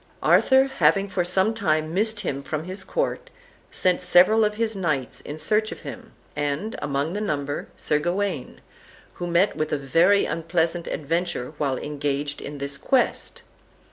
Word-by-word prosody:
Arthur, 265 0 +5
having 200 -7 +2
for 185 -1 0
some 190 +5 +1
time 155 -7 0
missed 215 +2 +1
him 140 -8 -3
from 150 +2 -4
his 185 +2 -5
court, - - -2 0.4
sent 180 -1 +1
several 185 +5 +5
of 210 0 +1
his 225 0 -1
knights 155 -9 -2
in 150 - -7
search 215 +6 +1
of - - -8
him, - - -9 0.2
and, 145 +9 -2
among 145 +3 -1
the 205 - -3
number, 145 -7 -2
Sir 150 - +1
Gawain, 175 -3 -2 0.5
who 175 - -5
met 175 +4 +2
with 155 0 -2
a 150 - +1
very 165 +9 +3
unpleasant 165 +1 -1
adventure 160 -3 -2
while 135 -3 0
engaged 145 0 -3
in 145 - -7
this 140 0 -4
quest. 260 -2 0
170 Hz, 160 wpm, -24 LUFS, 145-205 Hz, 0.5 s, Arthur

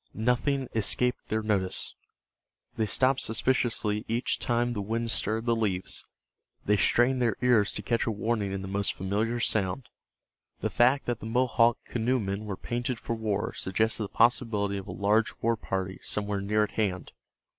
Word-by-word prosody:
Nothing 125 +4 0
escaped 120 +3 +1
their 110 0 0
notice. 100 -4 0 0.8
They 110 - 0
stopped 130 +6 +3
suspiciously 110 -2 +1
each 115 +3 0
time 120 0 0
the 105 - -3
wind 115 +3 -2
stirred 110 +5 0
the 115 -1 +2
leaves; 100 -5 -1 0.6
they 105 - +3
strained 120 +6 +3
their 115 -4 +2
ears 115 -5 +4
to 105 - -5
catch 115 +5 0
a - - +2
warning 110 -1 -1
in 95 0 -4
the - - -5
most 100 +1 -1
familiar 105 +5 -1
sound. 105 +1 0 0.7
The - - -2
fact 130 +4 +3
that 120 -2 -2
the 110 - -7
Mohawk 120 -1 +3
canoemen 110 -4 -1
were 100 -3 -4
painted 120 0 -3
for - - -3
war 110 -3 -2
suggested 110 +4 0
the 105 - -3
possibility 105 -4 +2
of 95 - -10
a - - -5
large 105 +3 +1
war 115 +1 +1
party 95 -3 -4
somewhere 100 -1 -1
near 105 +2 +2
at 105 - -3
hand. 95 -5 -2
110 Hz, 165 wpm, -28 LUFS, 100-120 Hz, 0.8 s, ears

